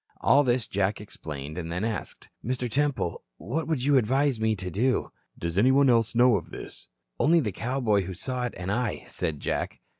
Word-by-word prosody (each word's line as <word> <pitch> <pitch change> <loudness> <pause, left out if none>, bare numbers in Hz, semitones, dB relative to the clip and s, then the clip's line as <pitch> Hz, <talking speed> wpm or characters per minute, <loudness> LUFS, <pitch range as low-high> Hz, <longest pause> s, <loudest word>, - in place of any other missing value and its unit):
All 145 +2 +5
this 120 -3 +1
Jack 100 +1 0
explained 75 -6 -7
and 85 -1 -5
then 90 +4 -2
asked: 110 -2 -4
"Mr. 125 +1 -2
Temple, 135 -7 -1 0.2
what 155 +7 -3
would 155 -6 -1
you 140 0 +4
advise 130 +2 +2
me 110 0 +2
to 90 -2 -5
do?" 125 +8 +1 0.3
"Does 85 +3 -1
anybody 130 +3 +5
else 115 -1 +2
know 120 -2 +5
of 85 - -7
this?" - - -10 0.3
"Only 165 +3 +5
the 115 -9 -1
cowboy 115 -1 0
who 95 0 -6
saw 125 +6 -3
it 120 - -5
and 90 +1 -3
I," 120 0 -1
said 75 -3 -3
Jack. - - -2
115 Hz, 190 wpm, -27 LUFS, 95-130 Hz, 0.3 s, All